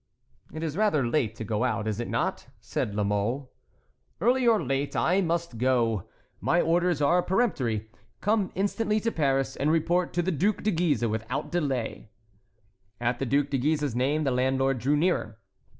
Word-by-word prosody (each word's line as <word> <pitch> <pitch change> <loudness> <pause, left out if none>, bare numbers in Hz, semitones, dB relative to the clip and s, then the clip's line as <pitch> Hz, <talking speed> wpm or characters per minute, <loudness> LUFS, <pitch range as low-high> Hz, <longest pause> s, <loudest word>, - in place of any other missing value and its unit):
"It 155 - -6
is 155 -2 -3
rather 200 - +2
late 120 -5 0
to 115 - -6
go 110 +2 -1
out, 110 -3 -1
is 110 0 -2
it 120 - -3
not?" - - -2
said 100 - -3
La 105 - +1
Mole. 105 +7 -1 0.7
"Early 245 +2 +3
or 225 -2 +5
late, 135 +1 -2
I 185 +3 +2
must 170 - -2
go; 115 -6 +1 0.3
my 170 - +2
orders 175 -2 +2
are 175 +5 +4
peremptory—'Come 175 - -1
instantly 210 +2 0
to 230 +2 -1
Paris, 135 -5 0
and 145 - 0
report 170 +2 +1
to 175 - +1
the 185 - 0
Duc 190 +7 0
de 215 - +2
Guise 160 - +1
without 110 +3 -3
delay.'" 135 -11 -2 0.9
At 120 0 -1
the 135 - -2
Duc 140 +2 +1
de 135 - +1
Guise's 145 -2 0
name 140 +5 +1
the 135 - +1
landlord 130 +1 +1
drew 140 +6 +2
nearer. 145 - 0
140 Hz, 170 wpm, -27 LUFS, 120-175 Hz, 0.9 s, or